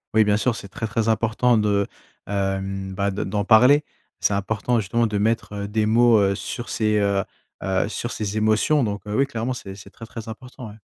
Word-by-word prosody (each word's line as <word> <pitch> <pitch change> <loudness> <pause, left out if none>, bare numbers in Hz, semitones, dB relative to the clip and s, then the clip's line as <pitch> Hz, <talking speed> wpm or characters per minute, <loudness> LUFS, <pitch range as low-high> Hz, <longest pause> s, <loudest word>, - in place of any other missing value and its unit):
Oui, 110 - +6
bien 105 0 +3
sûr, 120 +1 0
c'est 100 - -8
très, 110 +3 -5
très 110 +1 -1
important 115 +2 +2
de, 100 -2 +1 0.4
hem, 95 -1 -2
bah, 100 +1 0
de 95 - -3
d'en 100 +1 -2
parler. 125 +7 +6 0.4
C'est - - +1
important 110 +4 0
justement 115 +3 0
de 105 -1 -2
mettre 105 -1 -1
des 105 +1 0
mots, 115 0 +5
heu, 100 -1 +2
sur 120 +4 -6
ces, 105 -2 +1
heu 100 -1 +1 0.4
heu, 95 +1 0
sur 120 +4 -4
ces 105 0 -3
émotions 110 +7 +3
donc, 105 -2 -2
heu, 105 - -3
oui, 135 - +3
clairement 120 -2 -3
c'est 95 -6 -8
c'est 95 - -12
très, 115 - -11
très 115 0 -9
important, 125 +1 -9
ouais. 105 - -12
110 Hz, 210 wpm, -23 LUFS, 100-115 Hz, 0.4 s, Oui